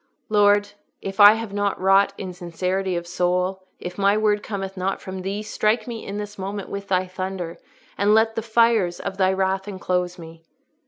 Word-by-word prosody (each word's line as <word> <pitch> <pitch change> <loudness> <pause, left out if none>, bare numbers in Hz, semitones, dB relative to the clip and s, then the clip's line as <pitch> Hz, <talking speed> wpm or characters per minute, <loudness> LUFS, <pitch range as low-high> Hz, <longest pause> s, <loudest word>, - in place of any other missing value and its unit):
"Lord, 205 -1 +4 0.3
if 195 +1 -6
I 205 +1 +10
have 225 -2 -5
not 205 -1 -1
wrought 195 +1 +4
in 185 -2 -6
sincerity 180 +2 -2
of 170 0 -3
soul, 180 +2 -1
if 180 +2 -7
my 200 +1 +4
word 210 -1 +2
cometh 195 -2 -5
not 190 +1 -2
from 190 0 -7
Thee, 200 +3 -3
strike 215 +1 0
me 230 -2 -6
in 200 - -5
this 210 -1 -6
moment 195 +1 -5
with 200 0 -6
Thy 185 -1 +1
thunder, 185 -2 -5 0.4
and 205 +2 +4
let 220 0 +3
the 225 - -2
fires 225 -5 +2
of 195 -1 -5
Thy 190 -1 +3
wrath 190 +1 0
enclose 180 -2 -2
me." 165 -1 -11
195 Hz, 190 wpm, -23 LUFS, 185-205 Hz, 0.4 s, I